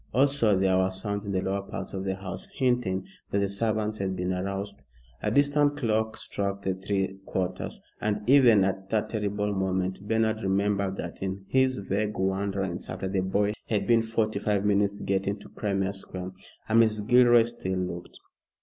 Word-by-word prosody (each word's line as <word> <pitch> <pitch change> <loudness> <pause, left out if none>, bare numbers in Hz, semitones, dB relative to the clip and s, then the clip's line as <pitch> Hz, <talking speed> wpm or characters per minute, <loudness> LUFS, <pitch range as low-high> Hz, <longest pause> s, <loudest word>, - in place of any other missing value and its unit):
Also 130 -6 +4
there 95 -1 +3
were 95 0 +2
sounds 100 +2 -3
in 100 - -3
the 95 -1 0
lower 100 +1 -1
parts 100 0 -7
of 95 0 -4
the 95 -1 -1
house 95 -1 -6
hinting 120 -8 +1 0.2
that - - 0
the 100 0 +2
servants 110 +1 -1
had 95 -1 -1
been 90 +1 -1
aroused. 95 -4 -4 0.4
A 105 - 0
distant 145 +3 +3
clock 110 -4 0
struck 100 0 -3
the 95 - 0
three 95 0 -2
quarters, 90 -1 -3 0.2
and 105 0 -1
even 125 -7 +6
at 95 0 -2
that 110 0 0
terrible 105 -1 -1
moment 95 -1 -1
Bernard 110 0 +1
remembered 100 0 0
that 85 - -6
in 95 0 -4
his 130 -1 +3
vague 105 +2 -1
wanderings 95 -1 -1
after 95 - -4
the 95 0 0
boy 100 +2 +1
he 110 - -1
had 100 -1 0
been 115 0 +4
forty 110 -2 -1
five 105 -1 0
minutes 100 0 +2
getting 100 +1 0
to - - -13
Crimea 100 -2 -1
Square. 95 -1 -6 0.4
And 115 +1 +5
Mrs. 110 -2 +1
Gilroy 120 -1 +7
still 115 -5 -3
looked. 90 -1 -5
100 Hz, 180 wpm, -27 LUFS, 95-110 Hz, 0.4 s, Gilroy